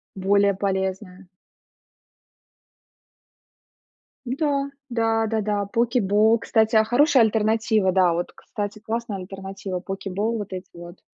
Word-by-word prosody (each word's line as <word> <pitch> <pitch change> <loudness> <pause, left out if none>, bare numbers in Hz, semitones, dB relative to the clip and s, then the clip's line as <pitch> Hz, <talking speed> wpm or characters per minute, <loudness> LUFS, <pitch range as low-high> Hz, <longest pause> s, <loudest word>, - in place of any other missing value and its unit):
Более 200 +1 +3
полезная. 190 -1 -3 3.0
Да 280 +5 -1 0.4
да 225 -2 +1
да 220 0 -1
да, 205 -1 -1
Poke 240 +1 +2
Bowl. 215 +3 +4
Кстати, 220 0 +1
а, 220 - +6
хорошая 260 +3 +4
альтернатива, 220 -2 +2
да, 185 -3 +4
вот 175 +1 -3
кстати, 210 -2 -6
классная 220 -1 -4
альтернатива- 195 0 -6
Poke 195 +1 -5
Bowl 220 +4 -1
вот 205 -2 -6
эти 185 0 -7
вот. 175 +1 -11
210 Hz, 120 wpm, -23 LUFS, 195-225 Hz, 3.0 s, а